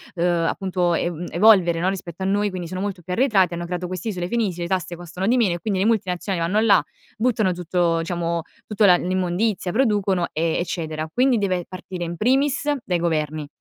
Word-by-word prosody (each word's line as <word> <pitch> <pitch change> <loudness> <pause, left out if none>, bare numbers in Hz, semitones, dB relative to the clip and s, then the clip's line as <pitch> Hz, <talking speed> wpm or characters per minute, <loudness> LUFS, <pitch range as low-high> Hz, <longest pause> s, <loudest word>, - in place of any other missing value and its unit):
ehm, 170 -1 +1
appunto 180 -3 0
ev 175 0 -2
evolvere 175 -4 +5
no, 185 - +2
rispetto 190 -1 -5
a - - -1
noi, 205 +1 +1
quindi 180 -3 -6
sono 185 +1 -5
molto, 195 -2 -4
arretrati 190 -5 +2
hanno 170 0 -4
creato 180 0 -4
queste 185 +5 -5
isole 180 -3 -3
felici, 200 -7 -1
le 170 - -2
tasse 175 -2 -2
costano 175 +2 -5
di 245 - +4
meno 210 -8 +2
e 175 - -6
quindi 195 +1 -2
le 195 - +2
multinazionali 190 -4 0
vanno 215 +3 +2
là, 210 - +6 0.4
buttano 220 -4 +1
tutto, 175 -1 0
diciamo, 170 0 -2 0.2
tutta 210 -1 +2
la 180 -2 +7
l'immondizia, 185 +2 -1
producono 205 -7 +1
e 165 +1 0
eccetera. 160 -3 -3
Quindi 250 -1 +3
deve 185 -4 -1
partire 185 0 -10 0.2
in 170 0 -5
primis 275 - +1 0.2
dai 175 -2 0
governi. 155 -3 -1
180 Hz, 195 wpm, -22 LUFS, 170-205 Hz, 0.4 s, la